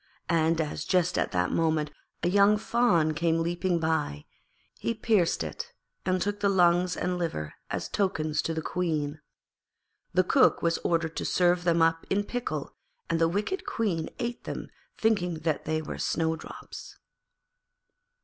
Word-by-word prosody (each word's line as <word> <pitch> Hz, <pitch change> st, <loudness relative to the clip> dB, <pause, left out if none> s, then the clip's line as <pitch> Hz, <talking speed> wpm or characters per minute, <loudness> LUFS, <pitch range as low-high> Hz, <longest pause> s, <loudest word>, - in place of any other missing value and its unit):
And 165 Hz, -1 st, +2 dB
as 150 Hz, -2 st, -2 dB
just 180 Hz, -2 st, +2 dB
at -, -, 0 dB
that 90 Hz, 0 st, +1 dB
moment 155 Hz, -2 st, +1 dB, 0.3 s
a -, -, +3 dB
young 200 Hz, +3 st, +5 dB
fawn 210 Hz, -9 st, +2 dB
came 165 Hz, +1 st, +1 dB
leaping 175 Hz, +1 st, 0 dB
by, 160 Hz, -, -1 dB, 0.5 s
he 230 Hz, -, -1 dB
pierced 215 Hz, -6 st, +2 dB
it 475 Hz, 0 st, -6 dB, 0.3 s
and 185 Hz, 0 st, +2 dB
took 205 Hz, +2 st, -1 dB
the 200 Hz, -1 st, +2 dB
lungs 180 Hz, -1 st, +3 dB
and 180 Hz, 0 st, -1 dB
liver 75 Hz, -, -3 dB, 0.2 s
as -, -, -3 dB
tokens 155 Hz, -7 st, 0 dB
to 165 Hz, -, -2 dB
the 160 Hz, -, -3 dB
Queen. 155 Hz, -4 st, -2 dB, 0.9 s
The 185 Hz, +1 st, +3 dB
Cook 260 Hz, +9 st, +4 dB
was 170 Hz, 0 st, +2 dB
ordered 165 Hz, -1 st, 0 dB
to -, -, -1 dB
serve 175 Hz, -1 st, +2 dB
them 170 Hz, -1 st, +4 dB
up 165 Hz, 0 st, +1 dB
in 205 Hz, +1 st, +1 dB
pickle, 245 Hz, +3 st, -4 dB, 0.4 s
and 165 Hz, -, +1 dB
the 165 Hz, -, +4 dB
wicked 210 Hz, -, -2 dB
Queen 180 Hz, -8 st, -1 dB
ate 240 Hz, -1 st, -4 dB
them -, -, -5 dB, 0.3 s
thinking 200 Hz, -6 st, +1 dB
that 155 Hz, -2 st, -1 dB
they 155 Hz, 0 st, -1 dB
were -, -, -6 dB
Snowdrop's. 160 Hz, -1 st, -3 dB
170 Hz, 155 wpm, -28 LUFS, 160-195 Hz, 0.9 s, young